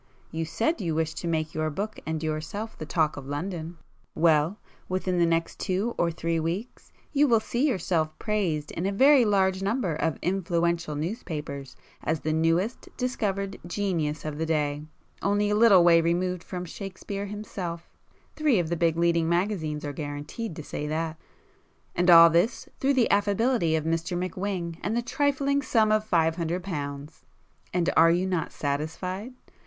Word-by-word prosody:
You 165 0 -2
said 225 - -1
you 165 -4 -1
wished 160 0 -1
to 170 - -4
make 160 -2 -1
your 155 0 -1
book 205 +8 -4
and 160 0 -2
yourself 160 +8 -4
'the 155 - -7
talk 155 -3 +1
of 135 -1 -7
London,'—well, 165 +1 -1 0.3
within 185 -1 0
the 170 - +4
next 165 0 -1
two 200 +5 -1
or 170 - +1
three 165 0 -1
weeks 175 +9 -4 0.2
you 290 +1 +4
will 230 -3 +5
see 240 +6 0
yourself 170 - 0
praised 180 -9 -1
in 175 +3 -2
a - - 0
very 265 +4 +6
large 190 -2 +2
number 200 -3 0
of 160 0 -1
influential 170 -3 0
newspapers 150 - -5 0.3
as 160 0 -1
the 155 - -1
newest 165 +8 0
discovered 200 -6 -2
'genius' 170 -6 -2
of 150 -1 -4
the 160 - 0
day, 150 -2 0 0.4
only 205 +1 +1
a - - +2
little 210 -5 +7
way 170 -1 +6
removed 175 +1 0
from 180 -1 -5
Shakespeare 195 +2 -6
himself 190 -5 -6 0.5
(three 305 -7 +3
of 170 -3 0
the 170 - 0
big 165 -1 +1
leading 170 -1 +2
magazines 170 -5 -1
are 145 - -4
guaranteed 150 - -5
to 155 - -7
say 150 - -5
that) 160 +1 -2 0.8
and 180 +1 +2
all 170 -1 +10
this 175 +8 +1
through 275 +1 +2
the 250 -3 +3
affability 205 -3 +2
of 155 - 0
Mr 165 +2 -1
McWhing, 180 -2 -3
and 215 +5 -1
the 240 - 0
trifling 280 +1 +1
sum 225 -5 +2
of 215 0 +3
five 165 -5 +2
hundred 170 +1 -2
pounds! 145 -4 -6 0.5
And 175 -1 0
are 165 +1 +7
you 175 +2 +2
not 180 -4 -1
satisfied? 180 - -3
175 Hz, 170 wpm, -27 LUFS, 160-205 Hz, 0.8 s, all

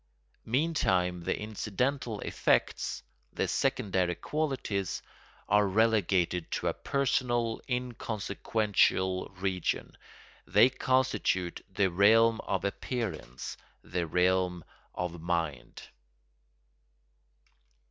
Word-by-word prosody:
Meantime 95 - +1
the - - -1
incidental 110 +3 -2
effects, - - 0 0.3
the - - 0
"secondary 95 -3 0
qualities," 130 - -2 0.4
are 105 0 +4
relegated 95 -5 +2
to - - -3
a - - +1
personal 125 -4 0
inconsequential 110 -5 0
region; 90 -1 -2 0.5
they 125 - +5
constitute 130 -10 0
the 95 0 +1
realm 110 +5 +5
of 95 - -1
appearance, 100 - -4 0.3
the 85 -2 -2
realm 90 0 +1 0.3
of 85 -2 -4
mind. 85 -5 -3
100 Hz, 80 wpm, -30 LUFS, 90-120 Hz, 0.5 s, they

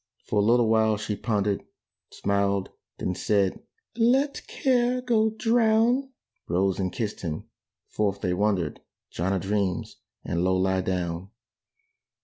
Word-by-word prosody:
For 105 - 0
a - - +4
little 120 +2 +4
while 110 -1 +3
she 105 0 -3
pondered: 105 -1 -1 0.5
Smiled: 100 -1 0 0.3
then 90 - -2
said, 100 0 +1 0.3
"Let 260 +5 +2
care 250 -1 +1
go 230 -3 +2
drown!" 230 +3 +2 0.4
Rose 95 +2 +1
and 95 -1 -1
kissed 110 -3 -4
him.... 80 -3 -4 0.4
Forth 100 -2 -1
they 90 - 0
wandered, 90 -5 0 0.3
John 90 +3 -1
a 95 - +1
dreams 95 -1 -2 0.3
and 85 0 -1
Low 95 0 +2
lie 95 0 +1
down. 90 0 -3
100 Hz, 130 wpm, -26 LUFS, -, 0.5 s, a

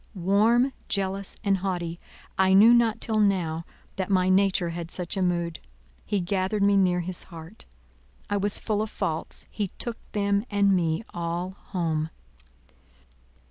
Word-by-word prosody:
Warm, 220 +8 +3 0.2
jealous, 195 0 -2
and 200 -2 +2
haughty, 175 -3 -3 0.4
I 190 0 +3
knew 215 +5 +8
not 230 -2 +3
till 220 -2 -1
now 175 -6 +1 0.3
that 190 0 -2
my 185 -1 +3
nature 185 -2 +3
had 170 0 -5
such 180 +1 -1
a 195 - -1
mood: 170 -2 0 0.4
he 205 -1 -1
gathered 190 +3 0
me 200 0 +4
near 180 -2 +3
his 180 +1 -3
heart. 165 +4 -11 0.6
I 205 - 0
was 200 +1 0
full 210 -2 -1
of 215 - -2
faults; 160 -5 -4
he 205 -2 -2
took 235 -1 -5
them 200 -1 +1
and 200 -1 +3
me 165 +1 0
all 175 +2 -3
home. 165 -5 -3
190 Hz, 150 wpm, -26 LUFS, 175-205 Hz, 0.6 s, knew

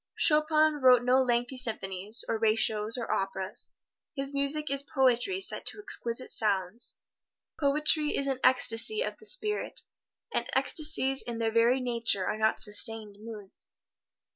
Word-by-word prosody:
Chopin 305 -1 +4
wrote 250 -2 +5
no 255 +2 +2
lengthy 245 +1 -2
symphonies, 210 -3 -3
oratorios 220 0 -1
or 235 - -5
operas. 195 0 -3 0.5
His 275 0 -2
music 280 +2 -1
is 275 0 +1
poetry 265 +6 0
set 385 - -2
to - - -1
exquisite 255 - -1
sounds. 200 +1 +2 0.6
Poetry 300 +1 0
is 275 - -1
an 270 -2 -3
ecstasy 255 - +3
of - - -7
the 435 - -8
spirit, 425 -3 -1 0.5
and - - -3
ecstasies 295 -4 +1
in 235 -1 -7
their 225 -1 -2
very 230 +3 +2
nature 235 -6 0
are 215 - -4
not 220 0 0
sustained 210 0 +2
moods. 215 -3 -9
245 Hz, 140 wpm, -27 LUFS, 220-280 Hz, 0.6 s, wrote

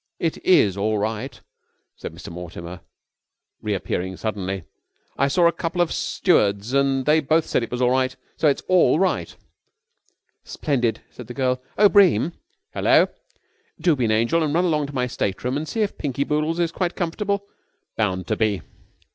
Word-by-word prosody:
"It 165 -2 -2
is 100 - +4
all 105 +2 0
right," 105 +1 -3 0.6
said - - -7
Mr. - - -10
Mortimer, 85 0 -8 0.8
re 105 -2 -1
appearing 95 0 -3
suddenly. 95 -4 -3 0.5
"I 140 - +2
saw 170 +5 +3
a 170 - +6
couple 170 +1 -4
of 175 -2 +2
stewards 105 - +1
and 135 -1 +2
they 155 +1 +4
both 155 +2 +2
said - - 0
it 115 - -4
was 125 +1 -2
all 125 - +3
right. 130 0 +1 0.2
So 155 - +2
it's 140 - +1
all 185 -4 +4
right." 190 +1 0 1.1
"Splendid," 125 -6 -1
said 125 - -11
the 120 - -8
girl. 125 -1 0 0.2
"Oh, 205 - +7
Bream!" 180 - +4 0.4
"Hello?" - - +4 0.7
"Do 165 -1 +3
be 125 -3 0
an 110 - +1
angel 115 +10 +2
and 155 -1 0
run 175 +2 +3
along 150 -4 +1
to 140 - -9
my 125 -1 +1
stateroom 120 +1 -2
and 150 +2 -3
see 225 - -2
if 205 - -4
Pinky 140 -2 -1
Boodles 150 +3 -1
is 170 -1 +1
quite 180 0 -2
comfortable." 200 +3 -2 0.5
"Bound 95 -4 -1
to 110 - -1
be." 105 -6 0
135 Hz, 175 wpm, -23 LUFS, 110-165 Hz, 1.1 s, Oh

